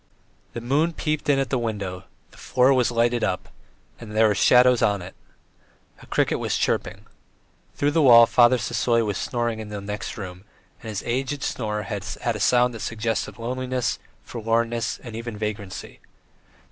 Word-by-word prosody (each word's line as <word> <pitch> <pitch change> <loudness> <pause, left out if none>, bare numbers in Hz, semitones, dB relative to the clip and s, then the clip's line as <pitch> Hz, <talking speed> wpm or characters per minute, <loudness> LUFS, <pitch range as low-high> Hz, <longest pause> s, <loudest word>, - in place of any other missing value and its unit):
The 120 - -5
moon 145 +8 +1
peeped 155 -2 -2
in 140 - +4
at 135 -1 -1
the 130 - +1
window, 100 -5 -4 0.3
the - - -19
floor 130 +1 +3
was 125 -2 +2
lighted 120 0 +1
up, 90 -1 -2 0.5
and 110 -2 -9
there 110 0 +5
were 105 - +2
shadows 125 +4 +5
on 100 -1 +2
it. 90 +1 -9 0.9
A - - -15
cricket - - 0
was - - -1
chirping. - - -2 0.7
Through 145 +1 +1
the 160 +2 +2
wall 120 -4 +8
Father 120 +2 +5
Sisoy 115 0 0
was 100 -2 -2
snoring 120 -2 -2
in 110 -1 -7
the 105 -1 -5
next 105 +1 -6
room, 90 -3 -8 0.4
and 110 - -8
his 105 -2 -4
aged 135 +4 -2
snore 105 -3 -2
had 100 -1 -5 0.2
a 115 -3 -1
sound 125 +3 +3
that 115 - -7
suggested 110 0 -3
loneliness, 125 +1 -2 0.2
forlornness, 115 0 -1
even 115 -1 -6
vagrancy. 105 -2 -6
115 Hz, 165 wpm, -24 LUFS, 105-125 Hz, 0.9 s, wall